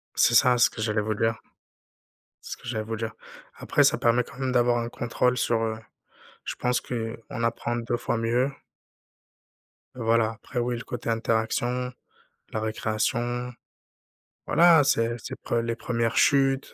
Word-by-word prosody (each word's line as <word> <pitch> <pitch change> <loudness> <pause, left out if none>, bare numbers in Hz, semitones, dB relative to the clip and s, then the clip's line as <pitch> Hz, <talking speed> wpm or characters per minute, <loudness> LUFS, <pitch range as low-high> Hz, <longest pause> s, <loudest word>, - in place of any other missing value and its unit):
C'est 115 - +4
ça, 125 +1 +6
c'est 120 - +6
ce - - +2
que 110 - -8
j'allais 105 -1 0
vous 110 +1 -1
dire 115 +1 0 1.0
c'est - - -5
ce - - -9
que - - -13
j'allais 110 -3 -2
vous 115 +1 -4
dire. 110 0 -4 0.4
Après, - - +2
ça - - +4
permet 120 +1 +3
quand 125 - -14
même 130 -1 -1
d'avoir 120 -1 +3
un 115 0 -3
contrôle 125 +1 0
sur 115 -2 +1
heu, 110 -1 -1 0.7
je - - -4
pense 125 0 0
qu'on 115 -1 -5
apprend 120 +1 -1
2 120 0 -1
fois 120 0 -2
mieux 120 +4 +1 1.5
voilà, 115 -2 +2
après 120 +2 -5
oui, 120 0 -1
le 115 - -7
côté 120 -1 -5
interaction, 115 +2 0 0.6
la 110 - -2
récréation. 120 +3 -1 1.0
Voilà, 170 -3 +6
c'est 115 -4 +1
c'est - - -7
pre - - -2
les 115 0 -2
1res 115 -1 -1
chutes, 135 -1 +3
120 Hz, 165 wpm, -26 LUFS, 115-125 Hz, 1.5 s, ça